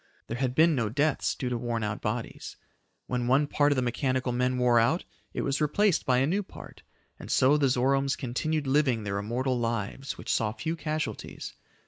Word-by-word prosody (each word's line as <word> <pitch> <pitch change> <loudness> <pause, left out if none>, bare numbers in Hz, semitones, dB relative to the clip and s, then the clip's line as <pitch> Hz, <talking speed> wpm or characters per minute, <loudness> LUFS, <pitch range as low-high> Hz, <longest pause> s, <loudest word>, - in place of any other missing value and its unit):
There 115 - -5
had 130 -1 -1
been 160 +2 +5
no 115 -6 0
deaths 145 +5 +1
due 125 - -3
to 120 -1 -2
worn 115 -2 -2
out 105 0 -3
bodies. 115 +2 -4 0.5
When 125 -1 -2
one 135 +4 +4
part 145 0 +2
of - - +3
the 130 - +1
mechanical 130 +1 0
men 125 +1 0
wore 125 -1 +4
out, 125 +10 +2 0.3
it - - -3
was 140 +2 -1
replaced 175 +4 +2
by 125 -1 +4
a 130 - +3
new 185 +8 +1
part, 195 - -12 0.4
and - - -9
so 130 +3 +4
the 140 -3 +3
Zoromes 135 +2 +2
continued 150 +4 -2
living 135 -5 +2
their 100 -1 -2
immortal 125 +4 -1
lives 115 +3 -3
which - - -2
saw 110 -1 0
few 160 +7 -3
casualties. 155 -1 -4
130 Hz, 195 wpm, -28 LUFS, 120-145 Hz, 0.5 s, been